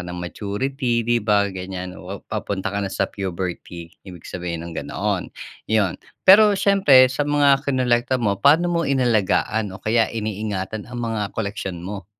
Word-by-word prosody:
ng 90 - -6
maturity, 120 +5 -2
'di 120 0 +1
ba, 105 -2 +1
ganyan. 90 0 -7
O 95 +1 -8
papunta 100 -1 -4
ka 100 - -1
na 100 - -2
sa - - -1
puberty, 90 -3 -6 0.2
ibig 90 -3 -11
sabihin 85 -2 -5
ng 85 - -8
gano'n, - - -3 0.4
yun. 105 -5 +1 0.2
Pero 205 +1 +7
siyempre 140 -11 +5
sa 145 +1 -1
mga 145 -2 +4
kinolekta 130 -2 +1
mo, 100 -5 -1
paano 165 - +4
mo 170 - +1
inalagaan 110 -4 +1
o 95 - -19
kaya 115 +1 +2
iniingatan 105 -2 -4
ang 120 - -8
mga 115 -4 -2
koleksyon 95 -5 -4
mo? 100 -2 -6
110 Hz, 160 wpm, -22 LUFS, 95-130 Hz, 0.4 s, Pero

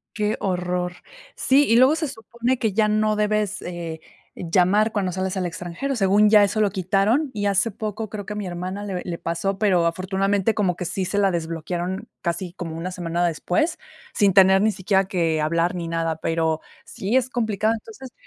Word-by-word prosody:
Qué 210 0 0
horror, 180 -1 -2 0.4
sí, 280 +2 +4
y 230 - +5
luego 260 +5 +6
se 315 -2 -2
supone 235 +2 -3
que 220 -3 0
ya 215 +1 +2
no 215 0 +2
debes, 210 -1 0
eh, 170 -2 -6 0.4
llamar 185 +5 +2
cuando 195 -3 -1
sales 190 +1 -2
al 185 -1 -1
extranjero, 180 +11 -4
según 205 +1 +4
ya 210 -2 +7
eso 215 +2 0
lo 205 -2 +3
quitaron, 200 - +1
y 205 -1 -2
hace 200 +3 +2
poco 215 +1 -4
creo 205 -1 -6
que 210 - -6
mi 205 -2 -4
hermana 185 +3 -5
le 185 -3 -4
le 170 -2 -4
pasó, 190 +4 -2
pero, 185 -5 +3
afortunadamente 195 +4 0
como 185 -5 0
que 180 - -4
sí 190 +2 -2
se 200 +3 -2
la 195 -1 +3
desbloquearon 175 +5 -3
casi 170 +1 -3
como 165 -4 -6
una 170 +3 -4
semana 175 -1 -1
después, 175 - 0 0.4
sin 200 -3 +3
tener 190 0 +6
ni 220 - +4
siquiera 195 0 +1
que 165 -4 0
hablar 170 +3 +1
ni 170 -2 -4
nada, 165 -1 -1
pero, 160 -1 -1 0.2
sí 210 +7 -2
es 255 -1 +2
complicado. 220 -2 0
Entonces, 265 - -10
195 Hz, 190 wpm, -23 LUFS, 175-215 Hz, 0.4 s, ya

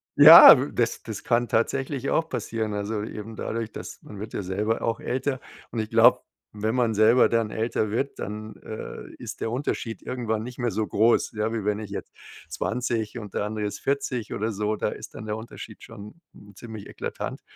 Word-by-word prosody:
ja, 150 -2 +11
w 140 - -3
das 120 -1 0
das 110 -3 -7
kann 120 0 +1
tatsächlich 135 +4 -1
auch 160 - +1
passieren. 110 -2 -3
Also, 105 +1 -3
eben 110 +1 -7
dadurch, 110 0 -4
dass - - -9
man 105 -2 -10
wird 110 - -7
ja - - -2
selber 105 +5 -1
auch 115 0 -1
älter 130 +1 -2 0.3
und 115 - -3
ich 110 -1 -2
glaube, - - +5 0.3
wenn 110 +3 -1
man 120 -3 +2
selber 110 +4 +5
dann 115 -2 +1
älter 110 -1 -1
wird, 135 +6 -2
dann, 110 +1 -6
äh, 110 - -8
ist - - -8
der 115 - -1
Unterschied 120 -4 -3
irgendwann 110 -4 -2
nicht 125 +2 -9
mehr 120 -1 0
so 110 0 -1
groß, 115 +3 +2
ja. 105 +1 -1
Wie 110 -3 -3
wenn 105 0 0
ich 105 -2 -7
jetzt 100 - -6 0.4
20 120 -2 -2
und 105 -4 -8
der 105 - -1
andere 105 0 -3
ist 105 - -4
40 130 -5 -2
oder 110 +2 -2
so, 105 +1 -1
da - - -1
ist - - -9
dann - - -8
der 105 0 -3
Unterschied 110 -1 -10
schon, 105 +1 -11 0.2
hm, 100 0 -16
ziemlich 110 -3 -9
eklatant. - - -6
110 Hz, 200 wpm, -25 LUFS, 105-120 Hz, 0.4 s, ja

